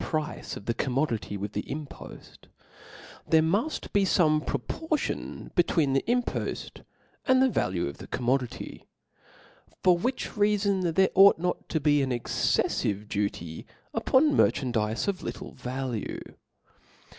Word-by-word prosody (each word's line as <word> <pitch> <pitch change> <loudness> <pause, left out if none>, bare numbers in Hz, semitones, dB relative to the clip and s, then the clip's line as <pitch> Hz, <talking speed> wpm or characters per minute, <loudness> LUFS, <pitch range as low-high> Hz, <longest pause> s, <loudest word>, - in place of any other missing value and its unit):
price 155 -2 -3
of 100 - -11
the 115 - 0
commodity 125 -5 -1
with 100 +1 -5
the - - -1
impoft, 145 0 -9 0.8
there 160 - +6
muft 205 - -1
be 200 - +4
feme 155 -5 +3
proportion 310 - -3
between 165 -5 +2
the 135 - +2
impoft 245 +1 -2 0.5
and 260 -1 +5
the 265 - +5
value 90 - 0
of 70 - -7
the - - -9
commodity; 125 0 -2 1.0
for 180 -1 +6
which 250 +10 -2
reafon 200 -5 +1
there 190 0 +5
ought 195 +1 +7
not 180 +2 -3
to 160 - 0
be 145 0 +3
an 135 - 0
excefliveduty 100 -7 -1 0.3
upon 290 +2 +3
merchandizes 115 - +1
of 195 -2 -1
little - - -6
value. 125 -3 -4
150 Hz, 125 wpm, -27 LUFS, 120-195 Hz, 1.0 s, ought